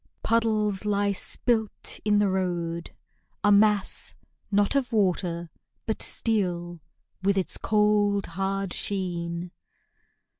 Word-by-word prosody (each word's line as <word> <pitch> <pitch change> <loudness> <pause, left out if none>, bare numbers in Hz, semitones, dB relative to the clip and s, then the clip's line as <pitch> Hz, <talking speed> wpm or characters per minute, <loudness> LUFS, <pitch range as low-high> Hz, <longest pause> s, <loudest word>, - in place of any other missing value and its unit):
Puddles 215 -3 +1
lie 205 -1 +1
spilt 220 +2 -2
in 210 -1 +3
the 205 0 +3
road 175 -3 -2 0.5
a 205 - +5
mass, 205 0 +3 0.3
not 205 +2 +2
Of 270 -3 +1
water, 180 -5 0 0.3
but 220 - -2
steel, 175 -6 -1 0.4
with 200 +1 +2
its 190 - +3
cold, 210 -2 +2
hard 195 +1 -2
sheen. 175 -3 -2
200 Hz, 105 wpm, -26 LUFS, 180-210 Hz, 0.5 s, a